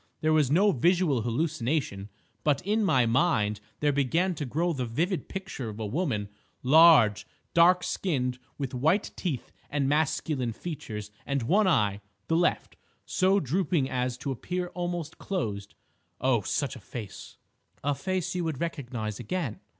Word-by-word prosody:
There 155 0 +3
was 150 -4 +3
no 195 +8 +4
visual 170 -3 +2
hallucination. 120 -4 -1 0.3
But 145 -2 +2
in 215 +2 +2
my 130 -11 +3
mind 115 -5 +2 0.2
there 145 -1 +3
began 165 +7 +1
to 145 -4 -4
grow 165 +7 0
the 130 -4 -3
vivid 170 - -1
picture 190 -11 -5
of 105 0 -8
a 110 - -2
woman—large, 125 - +3 0.3
dark 180 +2 +5
skinned, 125 -8 -1 0.2
with 135 -3 -4
white 160 +11 +1
teeth 150 - -3 0.2
and 140 -2 0
masculine 145 -4 0
features, 110 - -6
and 140 -3 -1
one 195 - +3
eye—the 100 - 0
left—so 185 +2 0
drooping 160 -2 0
as 125 -1 -1
to 135 - -4
appear 180 +7 -3
almost 175 -3 -4
closed. 105 - -3 0.4
Oh, 130 -3 +2
such 140 +7 -2
a - - -9
face—!" 105 0 -9 0.5
"A 145 +1 +1
face 185 +4 -2
you 180 -1 -1
would 160 -5 -3
recognise 120 -10 -4
again?" 130 - -3
145 Hz, 140 wpm, -28 LUFS, 120-175 Hz, 0.5 s, dark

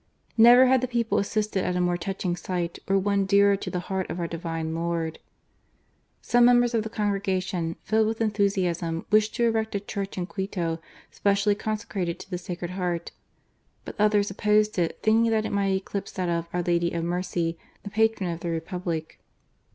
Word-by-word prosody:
Never 240 +3 +8
had 260 -1 +4
the 255 - -1
people 235 -2 0
assisted 205 -1 -1
at 180 - -1
a - - 0
more 175 0 +1
touching 180 0 -2
sight, 175 -1 -3
or 195 0 +3
one 200 0 +1
dearer 200 0 +5
to - - -5
the 180 - -3
Heart 190 0 -3
of 165 - -4
our 170 - -1
Divine 165 -1 -4
Lord. 165 -1 -2 1.0
Some 245 0 +4
members 245 0 +5
of 225 - +2
the 220 - -5
Congress, 200 -3 -1 0.3
filled 220 0 +2
with 225 0 -2
enthusiasm, 185 -6 0
wished 215 0 +3
to 240 - 0
erect 225 -2 +1
a - - +1
church 200 -1 -5
in 180 - -1
Quito 175 -4 -3 0.3
specially 200 +1 +2
consecrated 205 -4 -3
to 195 - -12
the 180 - -2
Sacred 175 -1 -5
Heart; 180 -2 -3 0.7
but - - -6
others 210 -1 +3
opposed 210 0 +2
it, 170 -2 0
thinking 225 +1 +4
that 220 -1 +1
it - - -3
might 195 -1 +1
eclipse 195 +1 -4
that 185 -2 -2
of 170 0 -1
" - - -34
Our 175 0 -1
Lady 170 0 +1
of 170 -1 -2
Mercy," 170 -1 -2 0.2
the 205 - -7
Patron 220 -3 +1
of 165 - -5
the 170 - -4
Republic. 165 -1 -4
195 Hz, 190 wpm, -26 LUFS, 175-215 Hz, 1.0 s, Never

